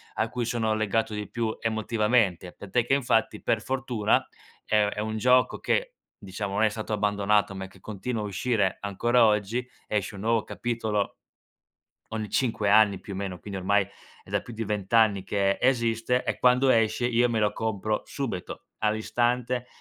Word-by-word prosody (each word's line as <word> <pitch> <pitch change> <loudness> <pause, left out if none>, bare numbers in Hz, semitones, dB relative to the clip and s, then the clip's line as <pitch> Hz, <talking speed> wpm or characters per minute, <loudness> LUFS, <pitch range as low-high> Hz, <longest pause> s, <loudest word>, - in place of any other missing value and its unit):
a 110 - 0
cui 120 +1 -3
sono 115 -2 0
legato 110 +1 0
di 105 0 -5
più 115 -2 -2
emotivamente, 110 -4 +1
tant'è 115 +4 -1
che 135 - +1
infatti 120 -5 +1
per 110 - 0
fortuna 125 -5 +1 0.4
è 105 -1 +3
è 105 - -6
un 110 +1 -2
gioco 125 +3 +3
che, - - 0 0.2
diciamo 100 0 -5
non 110 - +2
è 110 - +5
stato 110 +1 -6
abbandonato, 105 -1 +1
ma 95 0 -5
che - - -19
continua 110 +2 -4
a - - -3
uscire 100 0 0
ancora 120 +4 +2
oggi, 110 +3 +1 0.2
esce 100 -1 -2
un 100 - -8
nuovo 115 0 +1
capitolo 110 -4 -2 1.0
ogni 110 -2 -3
5 110 -5 0
anni 105 -2 +5
più 100 - -8
o - - -5
meno, 95 -2 -4
quindi 100 0 -6
ormai 100 +1 +2 0.4
è - - -18
da - - 0
più 120 - -10
di 115 0 -4
20 100 -1 -3
anni 105 -4 +4
che 100 -1 +1
esiste 120 -1 +1
e - - -1
quando 125 +2 +4
esce 115 0 +2
io 120 0 +3
me 115 - 0
lo 105 -1 +1
compro 110 -1 -2
subito, 115 -11 -5
all'istante, 120 +3 0
110 Hz, 175 wpm, -27 LUFS, 105-120 Hz, 1.0 s, è